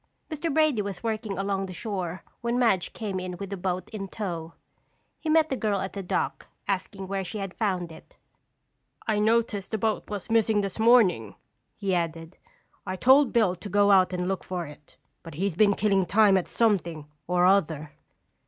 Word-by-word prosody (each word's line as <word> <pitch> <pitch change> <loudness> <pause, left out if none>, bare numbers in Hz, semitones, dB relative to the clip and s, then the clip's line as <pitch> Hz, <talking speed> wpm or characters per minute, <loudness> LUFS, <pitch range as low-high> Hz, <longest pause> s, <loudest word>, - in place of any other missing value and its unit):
Mr. 310 +1 -2
Brady 305 -6 +3
was 200 -2 -6
working 220 -3 -3
along 195 0 -1
the 185 - -8
shore 185 -4 -4 0.2
when 235 +1 -1
Madge 225 -7 +2
came 200 -4 -4
in 180 -1 -5
with 200 +1 -7
the - - -2
boat 180 -1 -3
in 200 -3 -5
tow. 170 -5 -5 0.7
He 320 - -4
met 315 0 +4
the 265 - 0
girl 210 -4 0
at 190 - -4
the 200 - -4
dock, 180 - -2 0.2
asking 195 0 -3
where 195 0 -2
she 215 +4 -6
had 195 -2 -5
found 185 -6 -2
it. 160 - -15 0.9
"I 215 -2 +1
noticed 220 -2 +1
the 220 - -1
boat 220 +1 -1
was 210 +1 -5
missing 220 -2 +3
this 195 +1 -4
morning," 215 - +4 0.4
he 195 -2 -1
added. 165 -1 -3 0.4
"I 185 -1 -4
told 265 +8 +5
Bill 215 -6 +3
to 195 +3 -9
go 205 +1 +4
out 185 -2 +5
and 180 0 -2
look 195 0 -2
for 180 -2 -4
it, 150 0 -14 0.2
but 165 -3 -10
he's 190 +1 -1
been 200 +1 +4
killing 195 -3 +2
time 205 +1 +5
at 185 - +1
something 175 -9 0 0.2
or 180 0 +3
other." 160 -6 +2
195 Hz, 190 wpm, -26 LUFS, 180-220 Hz, 0.9 s, told